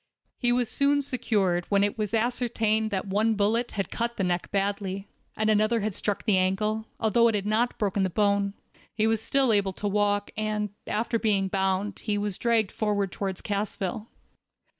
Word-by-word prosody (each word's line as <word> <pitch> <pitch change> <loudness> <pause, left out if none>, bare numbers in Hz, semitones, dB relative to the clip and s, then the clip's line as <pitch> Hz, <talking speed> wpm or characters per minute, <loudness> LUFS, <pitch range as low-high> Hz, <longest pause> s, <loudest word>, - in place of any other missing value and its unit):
He 240 -2 +2
was 245 -1 +1
soon 285 +3 +2
secured, 205 -9 0
when 200 -1 +3
it 205 - 0
was 210 -2 -2
ascertained 225 -2 +1
that 190 -3 -2
one 215 +3 +1
bullet 220 +4 +1
had 195 -2 -3
cut 235 0 -2
the 195 - 0
neck 180 -1 -1
badly, 195 0 -2 0.3
and 215 - +1
another 215 +2 +3
had 210 0 -2
struck 205 +1 -2
the 200 -4 +3
ankle, 210 +4 0
although 230 +1 +4
it 225 - +1
had 200 -1 -1
not 225 +3 +1
broken 200 -1 0
the 190 - +1
bone. 200 +1 +1 0.4
He 215 -1 +2
was 225 0 +1
still 265 -1 +2
able 200 -2 +1
to 205 - -3
walk, 205 0 +1
and, 210 -1 -2 0.2
after 230 +2 -1
being 200 -3 +1
bound, 190 +1 -1
he 210 -2 -1
was 205 -2 -2
dragged 230 -4 +2
forward 205 -3 -1
toward 190 -1 -4
Cassville. 205 0 -3
210 Hz, 185 wpm, -27 LUFS, 200-225 Hz, 0.4 s, although